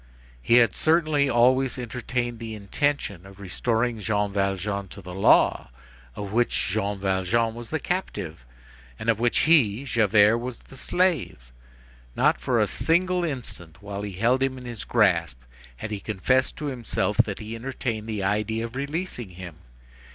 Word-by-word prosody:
He 115 - +3
had 115 -5 +5
certainly 155 -3 +2
always 130 +2 +3
entertained 120 -1 -3
the 115 -1 -6
intention 105 - -2
of 95 0 -14
restoring 115 +4 -1
Jean 105 -1 -1
Valjean 100 0 -1
to 100 - -11
the 90 -2 -9
law 95 -8 +4 0.5
of 100 -1 -6
which 120 -2 +1
Jean 100 0 -1
Valjean 95 +4 0
was 120 0 -9
the 160 - -1
captive, 90 - -4 0.5
and 115 - -3
of 110 -2 +2
which 120 0 +2
he, 135 -8 +4
Javert, 110 -2 +4
was 125 0 -5
the - - -16
slave. 145 - -1 0.6
Not - - +2
for - - +1
a - - +4
single 180 +2 +1
instant 115 - -6
while 100 0 -5
he 100 -1 -5
held 120 +7 +2
him 135 -1 0
in 125 - -10
his 120 -3 -6
grasp 85 - +2 0.4
had 105 - -7
he 105 - -3
confessed 115 +6 0
to 150 - -5
himself 125 -6 -2
that - - +2
he 110 +1 -7
entertained 115 -3 -4
the 105 -3 -2
idea 105 +3 0
of 115 +1 -9
releasing 140 - -4
him. 90 -3 -10
115 Hz, 160 wpm, -25 LUFS, 100-130 Hz, 0.6 s, had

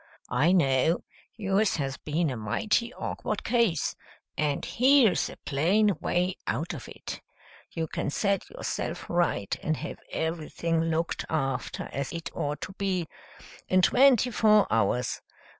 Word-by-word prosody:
I 140 +8 +3
know 155 -2 +3 0.3
yours 205 -1 +1
has 135 -2 -2
been 155 0 -1
a - - -3
mighty 215 - 0
awkward - - -3
case, 230 - +1 0.4
and 150 -2 0
here's 255 -4 +4
a - - -10
plain 190 +8 +2
way 180 +1 0
out 150 +11 -1
of 140 - -8
it. - - -8 0.5
You 165 - -3
can - - -3
set 200 +6 0
yourself - - -4
right 170 - 0
and 155 -1 -1
have - - -6
everything 165 0 -1
looked 165 0 -1
after 135 -5 -2
as 140 -1 -3
it 165 -1 -5
ought 145 0 -3
to 190 - -6
be, 185 -4 0 0.6
in 185 0 +3
twenty 250 0 +5
four 215 -2 +5
hours. 115 +3 +1
170 Hz, 140 wpm, -28 LUFS, 145-200 Hz, 0.6 s, twenty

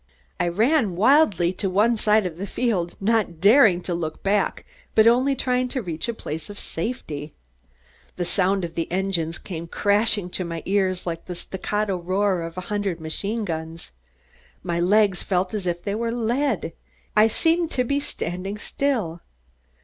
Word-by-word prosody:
I 175 - +1
ran 220 - +2
wildly 200 - +4
to 195 0 -2
one 210 +5 +3
side 215 -1 +3
of 170 -3 -4
the 200 +3 -4
field, 190 -7 -1
not 205 -5 +1
daring 205 - +6
to 180 - -3
look 160 -2 -4
back 200 +1 0 0.3
but 220 - +6
only 255 +4 +4
trying 250 0 0
to 255 +1 -3
reach 165 +3 -3
a - - 0
place 155 -4 -6
of 205 - -9
safety. 160 - -5 0.8
The 175 - -2
sound 190 +1 +1
of 165 - -8
the 165 - -3
engines 175 -3 -1
came 170 -3 -7
crashing 205 0 +2
to 185 - -2
my 170 -2 -5
ears 190 -2 0
like 165 -1 -4
the 180 - -5
staccato 195 +2 -2
roar 185 +1 0
of 165 +1 -7
a - - -2
hundred 200 -2 -2
machine 200 +8 -3
guns. 160 - -5 0.7
My 170 -1 -1
legs 195 +1 +3
felt 185 0 0
as 200 -4 -3
if 175 0 -2
they 200 - -2
were 230 +2 -1
lead. 235 - -1 0.4
I 215 +1 +6
seemed 330 +8 +1
to 250 - 0
be 280 +3 0
standing 190 - -4
still. 210 -9 -2
195 Hz, 170 wpm, -24 LUFS, 175-220 Hz, 0.8 s, daring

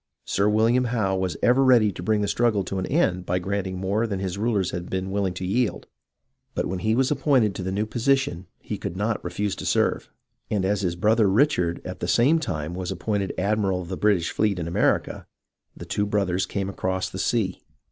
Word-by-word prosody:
Sir 100 +2 +1
William 115 +4 +3
Howe 110 -5 0
was 95 -3 -2
ever 125 +3 +5
ready 120 -5 +5
to 90 - -8
bring 105 +3 +1
the 100 - 0
struggle 115 -4 +1
to 95 +1 -4
an 95 - -3
end 95 - +1
by 90 0 -1
granting 95 0 -3
more 100 +5 0
than 100 -3 -2
his 95 -1 -3
rulers 100 -3 0
had 85 0 -5
been 95 0 -3
willing 95 -2 -1
to 95 - -4
yield. 115 +4 0 0.7
But - - 0
when 95 0 -3
he 110 +5 +1
was 130 +2 +2
appointed 130 -7 +2
to 95 - -6
the 95 +1 -3
new 105 +3 0
position 120 -6 0
he 105 - -6
could 95 -3 -5
not 105 +2 -1
refuse 105 -1 -2
to - - -6
serve, - - +1 0.4
and 100 -3 0
as 100 +1 +1
his 90 -3 -1
brother 105 +3 +3
Richard 95 - +2
at 90 0 -6
the - - -3
same 125 - +4
time 80 - -3
was 90 0 -4
appointed 100 0 -2
Admiral 100 -1 +1
of 85 - -11
the 95 - -3
British 95 -4 +1
fleet 105 -3 +1
in 85 -2 -3
America, 85 - 0 0.5
the - - -8
two 105 0 -1
brothers 100 -3 0
came 100 -1 -2
across 95 -1 -2
the 95 - -7
sea. 100 -3 0
100 Hz, 215 wpm, -24 LUFS, 95-110 Hz, 0.7 s, ever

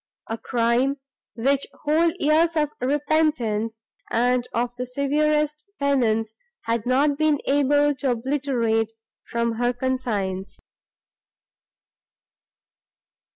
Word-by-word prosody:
—a 225 - -2
crime, 245 +3 +1 0.4
which 270 +4 +1 0.2
whole 315 +3 +3
years 325 +1 +3
of 300 -1 +1
repentance 255 -6 0 0.3
and 245 +1 +1
of 240 +1 -1
the 250 +1 -4
severest 300 +3 0 0.2
penance 225 -6 +1 0.3
had 230 0 -2
not 280 +3 +2
been 310 -1 +3
able 290 +1 +3
to 270 0 -2
obliterate 235 -3 0 0.3
from 235 0 -1
her 245 +1 +2
conscience. 220 -7 -3
260 Hz, 95 wpm, -24 LUFS, 235-290 Hz, 0.4 s, whole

